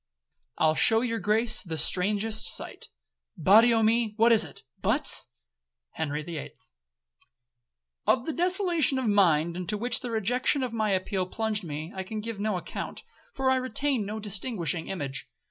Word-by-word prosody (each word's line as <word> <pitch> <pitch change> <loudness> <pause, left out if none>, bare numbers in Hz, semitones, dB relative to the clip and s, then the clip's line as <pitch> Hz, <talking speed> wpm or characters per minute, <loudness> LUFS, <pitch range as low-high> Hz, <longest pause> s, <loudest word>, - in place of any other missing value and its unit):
I'll 155 -1 +3
shew 225 +8 +4
your 230 -2 -2
Grace 220 +1 +3
the 165 -4 -5
strangest 210 +7 +1
sight,— - - -4 0.5
Body 220 +8 +6
o'me, 225 -1 +2
what 230 +1 +5
is 225 - +6
it, - - -11 0.2
Butts?— - - +2 0.6
HENRY 150 -1 -3
THE 165 -1 -6
EIGHTH - - -12 1.4
'Of 250 -1 +2
the 320 - -3
desolation 350 -5 +1
of 260 - -2
mind 170 -6 +3
into 180 +4 -3
which 235 +1 +1
the 245 - -6
rejection 245 +5 0
of 250 -3 -4
my 215 -2 0
appeal 190 -1 -1
plunged 215 0 -2
me, 155 +1 -6
I 190 - -3
can 215 +3 -6
give 220 -1 -6
no 210 -2 -1
account, 175 - -7 0.3
for 265 -1 +1
I 260 - +3
retain 260 -1 -1
no 210 +2 -5
distinguishing 200 -5 -2
image. 140 -8 -5
215 Hz, 160 wpm, -27 LUFS, 185-235 Hz, 1.4 s, Body